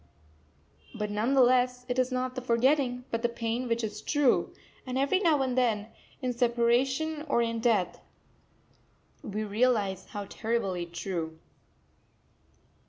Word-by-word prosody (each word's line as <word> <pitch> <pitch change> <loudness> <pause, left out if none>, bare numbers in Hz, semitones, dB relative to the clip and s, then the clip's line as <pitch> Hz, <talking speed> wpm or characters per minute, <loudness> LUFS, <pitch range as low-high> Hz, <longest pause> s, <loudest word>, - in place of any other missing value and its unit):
But 210 0 -3
none 220 +6 +1
the 265 - +7
less 250 0 +2
it 250 0 -1
is 255 0 +1
not 255 0 -1
the 255 - -5
forgetting, 250 +1 +1
but 230 - -1
the 240 - +1
pain 235 +1 -2
which 230 0 0
is 210 -1 -4
true; 290 -1 +2 0.3
and 255 0 -4
every 280 +8 +2
now 320 -8 +3
and 255 -2 -1
then, 225 -4 +1 0.3
in 250 -1 0
separation 250 +6 +1
or 235 - +3
in 230 0 -2
death, 220 -7 +1 1.2
we 210 +1 -4
realise 210 -3 +1
how 205 -1 -6
terribly 195 -6 -2
true. 170 -2 -4
240 Hz, 140 wpm, -29 LUFS, 215-255 Hz, 1.2 s, the